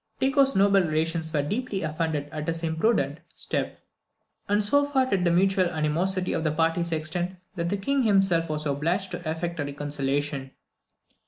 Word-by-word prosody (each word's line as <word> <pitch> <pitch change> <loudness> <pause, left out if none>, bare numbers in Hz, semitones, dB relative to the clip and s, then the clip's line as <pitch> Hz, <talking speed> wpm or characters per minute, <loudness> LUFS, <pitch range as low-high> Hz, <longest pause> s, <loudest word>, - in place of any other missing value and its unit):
Tycho's 270 0 +3
noble 195 0 +5
relations 160 0 -1
were 150 -3 +1
deeply 205 - -2
offended 155 -2 -2
at 155 -1 -5
this 165 0 -1
imprudent 160 -3 +1 0.2
step; - - -4 0.7
and 205 +1 +3
so 285 +8 +4
far 280 -2 +2
did 195 -8 0
the 175 - +3
mutual 185 +2 +3
animosity 175 +4 0
of 160 - -1
the 155 - +1
parties 165 +2 0
extend, 175 +4 -2 0.2
that 170 0 -2
the 200 - 0
King 275 +8 0
himself 195 -7 +3
was 155 0 -3
obliged 170 +7 -1
to 175 -2 -4
effect 170 +1 -3
a - - +1
reconciliation. 145 -1 -2
170 Hz, 165 wpm, -26 LUFS, 155-195 Hz, 0.7 s, noble